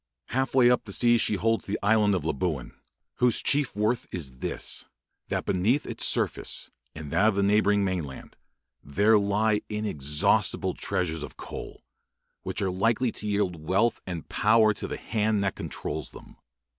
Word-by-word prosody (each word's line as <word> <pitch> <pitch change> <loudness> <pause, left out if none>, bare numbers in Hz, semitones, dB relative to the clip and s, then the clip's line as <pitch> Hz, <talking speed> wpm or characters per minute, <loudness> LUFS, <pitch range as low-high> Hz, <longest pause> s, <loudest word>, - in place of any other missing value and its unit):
Half 130 +1 -1
way 125 -2 +6
up 125 - +1
the 100 - -7
sea 120 +1 +4
she 105 - +1
holds 115 +4 0
the 100 - -1
island 105 -1 +3
of 95 - -3
Labuan, 70 -3 -2 0.4
whose 125 -2 +2
chief 145 -5 +1
worth 110 +3 -1
is 65 -8 -6
this, - - -3 0.4
that - - -2
beneath 110 +10 +1
its - - -3
surface - - -1 0.2
and 75 -2 -8
that 95 +7 +3
of 110 - +2
the 100 - +1
neighbouring 105 0 +3
mainland 85 -8 -5 0.5
there 105 +9 +3
lie 105 +1 +1
inexhaustible 75 -10 +1
treasures 90 -5 -2
of 75 - -8
coal, - - -8 0.6
which - - -3
are 95 - 0
likely 115 +6 +1
to 105 - -6
yield 95 -6 -1
wealth 105 +6 +2
and 85 -4 -5
power 110 0 +4
to - - -6
the - - -5
hand 105 -2 0
that 100 - 0
controls 75 0 -5
them. - - -14
105 Hz, 165 wpm, -27 LUFS, 90-110 Hz, 0.6 s, way